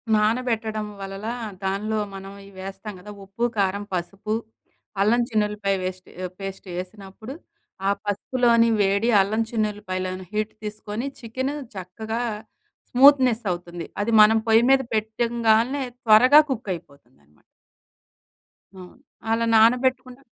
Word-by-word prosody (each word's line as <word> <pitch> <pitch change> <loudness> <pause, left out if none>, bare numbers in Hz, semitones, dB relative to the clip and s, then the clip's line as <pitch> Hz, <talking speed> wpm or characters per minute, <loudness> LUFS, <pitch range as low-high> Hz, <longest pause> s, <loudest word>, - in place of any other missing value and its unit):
నానబెట్టడం 220 -1 0
వలన 195 +1 -7 0.4
దానిలో 210 +3 -1 0.2
మనం 195 0 -8 0.2
ఇవేస్తాం 195 +2 -8
కదా! 210 +3 -10
ఉప్పు, 195 +5 -6
కారం, 200 0 0
పసుపు, 195 +4 -3 0.7
అల్లం 225 +4 +3
చిన్ను‌ల్లిపాయ 210 -2 0
వేస్ట్ 185 0 -6 0.3
పేస్ట్ 195 0 -7
వేసినప్పుడు, 195 +5 -8 0.5
ఆ - - +4 0.2
పసుపులోని 230 +3 +2
వేడి 200 +4 +2
అల్లం 215 +4 0
చిన్ను‌ల్లిపాయలోని 185 -4 -3
హీట్ 215 0 -2
తీసుకొని 210 +3 -5
చికెన్ 260 +4 -3 0.2
చక్కగా 220 +5 -5 0.7
స్మూత్‌నెస్ 255 -3 +5
అవుతుంది. 175 -1 -6
అది 230 +3 -1
మనం 220 +1 +6
పొయ్యి 225 +2 +5
మీద 270 0 +5
పెట్టంగానే 230 +4 +1 0.2
త్వరగా 250 +7 +7
కుక్ 225 -5 -4
అయిపోతుందనమాట. 125 - -18 1.3
అవును. 180 -1 -12 0.4
అలా 230 +1 +1
నానబెట్టుకున్న 250 +3 +3
215 Hz, 105 wpm, -23 LUFS, 195-230 Hz, 1.3 s, త్వరగా